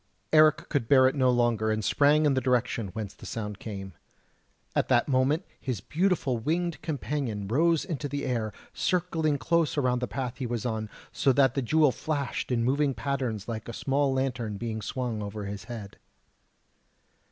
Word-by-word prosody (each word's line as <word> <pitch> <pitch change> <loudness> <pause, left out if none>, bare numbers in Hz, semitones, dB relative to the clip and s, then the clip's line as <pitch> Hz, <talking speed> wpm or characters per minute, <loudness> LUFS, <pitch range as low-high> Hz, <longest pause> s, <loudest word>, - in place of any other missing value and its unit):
Eric 155 0 +5
could 140 -7 -1
bear 130 -1 +6
it 130 - +1
no 130 -3 +3
longer, 120 -3 +2
and 110 -1 -1
sprang 150 +2 +4
in 145 - +4
the 130 - +1
direction 125 -3 0
whence 105 -3 -5
the - - -11
sound 105 -3 -5
came. 95 -3 -7 0.8
At - - +2
that 120 -2 +3
moment 140 +5 +2
his 125 -7 -3
beautiful 150 - 0
winged 170 +7 -1
companion 135 -9 -3
rose 165 - +2
in 165 -7 -3
the 145 -1 -3
air, 115 -4 -1 0.2
circling 165 -5 0
close 165 +4 +1
around 125 -3 +2
the 125 - -2
path 125 -2 -4
he 130 - -2
was 120 -1 -3
on, 110 -2 -2 0.2
so 120 +4 +2
that 135 -2 +4
the 135 - 0
jewel 150 +3 +4
flashed 140 0 -3
in 115 -2 +1
moving 135 +2 +1
patterns 115 -3 -2
like 110 -3 -5
a - - -5
small 140 +3 +1
lantern 125 -5 -1
being 110 0 -4
swung 120 -2 -3
over 105 0 -5
his 100 -1 -6
head. 110 -4 -8
130 Hz, 175 wpm, -28 LUFS, 115-145 Hz, 0.8 s, bear